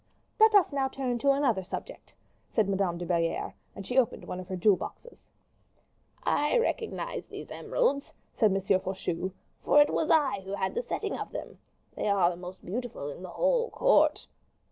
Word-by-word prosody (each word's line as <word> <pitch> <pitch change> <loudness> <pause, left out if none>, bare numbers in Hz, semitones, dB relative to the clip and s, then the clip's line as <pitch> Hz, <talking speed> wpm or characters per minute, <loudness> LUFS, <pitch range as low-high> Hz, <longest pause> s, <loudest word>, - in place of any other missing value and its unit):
"Let 440 0 +6
us 380 -7 +5
now 270 -1 +1
turn 260 -2 -2
to 280 - +2
another 275 -8 +3
subject," - - -8 0.3
said 215 -3 +1
Madame 190 -3 0
de 175 - -5
Belliere; 170 -1 0 0.2
and 195 - -8
she 250 +5 +3
opened 245 - 0
one 180 - -5
of 185 - -8
her 190 - -4
jewel 190 +3 +4
boxes. 485 - -10 0.9
"I 295 +11 +2
recognize 475 +1 -2
these - - -9
emeralds," 285 - 0 0.2
said 220 - +4
M. 195 - +1 0.2
Faucheux; 185 -1 -3 0.3
"for 295 - +5
it 290 - +5
was 320 - 0
I 290 -10 +3
who 190 +1 -7
had 190 -1 -2
the 480 - -1
setting - - -3
of - - -6
them. - - -7 0.4
They - - -2
are 190 -3 +4
the - - -6
most 180 +1 -10
beautiful 215 - -4
in 145 - -10
the 185 - -7
whole - - +1
court. - - +3
220 Hz, 185 wpm, -29 LUFS, 185-295 Hz, 0.9 s, Let